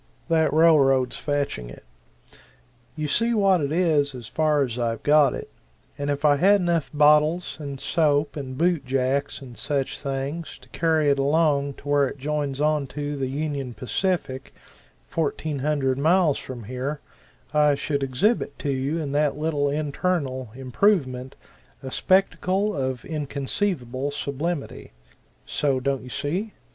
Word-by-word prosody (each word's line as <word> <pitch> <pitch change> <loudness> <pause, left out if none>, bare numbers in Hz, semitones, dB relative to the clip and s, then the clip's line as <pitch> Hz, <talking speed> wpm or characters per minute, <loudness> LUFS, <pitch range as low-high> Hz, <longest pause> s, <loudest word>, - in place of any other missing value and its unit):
That 160 -1 +3
railroad's 140 -6 +4
fetching 140 - -2
it. 60 - -12 1.1
You 155 -1 -2
see 230 +10 +1
what 195 -4 +3
it 140 0 -1
is 155 -5 +2
as 120 -2 -8
far 155 -2 +2
as 125 -2 -4
I've 115 -1 -2
got, 145 -2 +5 0.6
and 145 0 -3
if 145 +1 -1
I 145 -1 +5
had 200 +6 +5
enough 170 -4 0
bottles 150 +3 +3
and 140 -3 -6
soap 150 -2 +1
and 130 -3 -6
boot 170 -2 +2
jacks 135 +2 -1
and 125 -3 -11
such 140 0 -1
things 140 +4 -4
to - - -18
carry 160 -3 +1
it 140 - +1
along 140 -1 +2
to 145 - -14
where 145 -1 +3
it 140 - -7
joins 145 -1 -2
onto 145 -1 -1
the 135 -2 -2
Union 140 -3 -3
Pacific, 135 -2 -2 0.5
fourteen 155 -2 -2
hundred 135 -2 0
miles 160 0 +3
from 125 -3 -8
here, 130 +6 -4 0.5
I 150 -1 +4
should 140 0 -2
exhibit 140 - 0
to 145 - -2
you 135 +4 -1
in 150 -4 -3
that 145 0 +1
little 150 -2 0
internal 145 -3 -2
improvement 130 - 0 0.5
a 130 - -6
spectacle 195 +3 +1
of 130 -3 -3
inconceivable 140 - -2
sublimity. 145 - -4 0.5
So, 140 -3 0
don't 135 0 -1
you 125 - -10
see? 165 - -3
145 Hz, 145 wpm, -24 LUFS, 135-155 Hz, 1.1 s, got